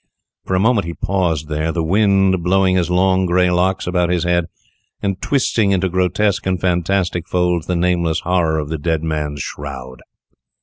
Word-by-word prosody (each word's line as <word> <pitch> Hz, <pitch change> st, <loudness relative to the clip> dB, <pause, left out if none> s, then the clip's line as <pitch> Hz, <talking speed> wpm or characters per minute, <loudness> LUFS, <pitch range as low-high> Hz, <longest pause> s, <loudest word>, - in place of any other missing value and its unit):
For 95 Hz, -, -1 dB
a -, -, +2 dB
moment 105 Hz, -3 st, +2 dB
he 85 Hz, -, -5 dB
paused 90 Hz, -7 st, -1 dB
there, 75 Hz, +1 st, -2 dB
the 85 Hz, 0 st, -2 dB
wind 95 Hz, 0 st, +2 dB
blowing 95 Hz, +1 st, +2 dB
his 90 Hz, -2 st, 0 dB
long 95 Hz, +1 st, +2 dB
grey 90 Hz, +1 st, +2 dB
locks 95 Hz, +2 st, 0 dB
about 90 Hz, -1 st, 0 dB
his 90 Hz, -2 st, 0 dB
head, 85 Hz, -1 st, +1 dB, 0.5 s
and 100 Hz, -2 st, -3 dB
twisting 115 Hz, -6 st, +1 dB
into 95 Hz, -1 st, +1 dB
grotesque 95 Hz, +3 st, 0 dB
and 95 Hz, -1 st, 0 dB
fantastic 90 Hz, 0 st, 0 dB
folds 90 Hz, -2 st, 0 dB
the 90 Hz, -, -1 dB
nameless 85 Hz, -2 st, 0 dB
horror 85 Hz, -3 st, +1 dB
of 75 Hz, -2 st, -3 dB
the 80 Hz, -1 st, -3 dB
dead 80 Hz, 0 st, -1 dB
man's 75 Hz, -3 st, -3 dB
shroud. 65 Hz, -3 st, -8 dB
90 Hz, 175 wpm, -18 LUFS, 80-95 Hz, 0.5 s, a